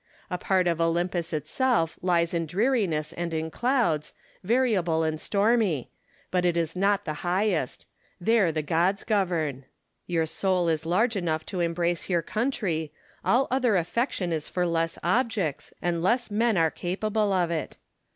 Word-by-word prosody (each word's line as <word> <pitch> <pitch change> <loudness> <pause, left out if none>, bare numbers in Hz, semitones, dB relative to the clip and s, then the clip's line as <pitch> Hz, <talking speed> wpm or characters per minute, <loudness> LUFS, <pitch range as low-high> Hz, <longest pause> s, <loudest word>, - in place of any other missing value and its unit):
A 180 - -1
part 190 -2 +2
of 170 -1 +1
Olympus 170 +1 0
itself 165 - 0
lies 170 -2 +1
in 165 -1 -1
dreariness 185 - 0
and 170 0 -3
in 160 0 -2
clouds, 235 - 0 0.3
variable 190 -8 +2
and 155 -1 -1
stormy; 205 - +1 0.4
but 180 -1 +1
it 175 -1 +2
is 165 0 -1
not 200 +2 +1
the 155 - -2
liighest: 180 -5 0 0.3
there 200 -2 +3
the 155 -1 -2
gods 175 +6 +1
govern. 165 - 0 0.4
Your 165 -2 +1
soul 180 +1 +1
is 160 0 -1
large 220 +7 +2
enough 160 -4 -1
to 185 - -5
embrace 170 +1 0
your 170 -2 +1
country: 195 - -1 0.3
all 260 +3 +3
other 250 -5 +2
affection 180 - 0
is 155 -2 -3
for 180 -1 0
less 165 -1 0
objects, 195 - 0
and 170 -1 0
less 235 +5 +1
men 225 0 +2
are 165 -1 +3
capable 210 +3 -1
of 180 -3 +1
it. 160 -3 -3
175 Hz, 155 wpm, -26 LUFS, 165-210 Hz, 0.4 s, there